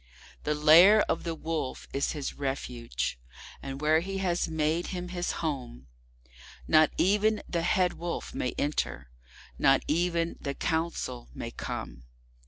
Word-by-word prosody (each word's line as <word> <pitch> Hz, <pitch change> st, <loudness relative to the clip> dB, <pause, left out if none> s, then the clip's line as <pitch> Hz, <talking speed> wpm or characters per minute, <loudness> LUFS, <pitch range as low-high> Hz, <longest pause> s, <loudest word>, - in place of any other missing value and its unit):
The 150 Hz, -, +1 dB
Lair 170 Hz, +8 st, +7 dB
of -, -, -2 dB
the 165 Hz, -1 st, -2 dB
Wolf 160 Hz, -4 st, -4 dB
is 140 Hz, -, 0 dB
his 145 Hz, -3 st, -4 dB
refuge, 120 Hz, -, -3 dB, 0.4 s
and 135 Hz, 0 st, -6 dB
where 155 Hz, +1 st, +4 dB
he 195 Hz, +3 st, -4 dB
has 180 Hz, -2 st, 0 dB
made 160 Hz, +2 st, 0 dB
him 180 Hz, -1 st, -5 dB
his 175 Hz, -1 st, -2 dB
home, 125 Hz, -, -4 dB, 0.8 s
Not 155 Hz, 0 st, +6 dB
even 210 Hz, +3 st, +2 dB
the 170 Hz, -, -1 dB
Head 180 Hz, +1 st, +2 dB
Wolf 175 Hz, 0 st, -5 dB
may 125 Hz, -, -2 dB
enter, 145 Hz, -, -2 dB, 0.5 s
not 135 Hz, 0 st, +4 dB
even 170 Hz, +1 st, 0 dB
the 140 Hz, -1 st, -3 dB
Council 160 Hz, -, -2 dB
may -, -, -5 dB
come. -, -, -6 dB
160 Hz, 140 wpm, -29 LUFS, 140-175 Hz, 0.8 s, Lair